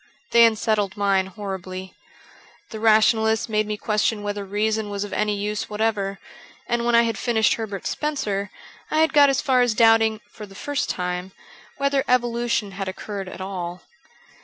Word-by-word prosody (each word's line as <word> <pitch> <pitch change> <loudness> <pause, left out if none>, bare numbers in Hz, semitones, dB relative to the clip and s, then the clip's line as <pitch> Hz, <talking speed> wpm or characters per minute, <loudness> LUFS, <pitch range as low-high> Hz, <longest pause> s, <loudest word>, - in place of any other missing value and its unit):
They 235 0 +7
unsettled 215 -3 0
mine 195 -2 +2
horribly. 190 -2 -7 0.8
The 220 - -6
rationalists 220 0 +3
made 215 -1 0
me 210 0 -3
question 210 0 0
whether 205 0 -3
reason 210 +2 -1
was 200 0 -3
of 205 - -7
any 210 -1 0
use 210 +1 -3
whatever; 210 -2 -1 0.5
and 235 0 0
when 240 0 +3
I 235 - +6
had 230 -1 -2
finished 225 -3 +2
Herbert 205 -4 -5
Spencer 210 -10 -2 0.4
I 310 - -1
had 320 - +2
got 290 -2 +7
as 270 - +1
far 260 -4 +3
as 245 -3 +2
doubting 225 -1 +4
(for 210 - -10
the 195 - -15
first 285 +5 -3
time) 180 +1 -3 0.4
whether 280 -1 +1
evolution 240 -4 0
had 195 0 -5
occurred 195 0 -6
at 185 - -9
all. 180 -2 -5
215 Hz, 165 wpm, -23 LUFS, 200-230 Hz, 0.8 s, They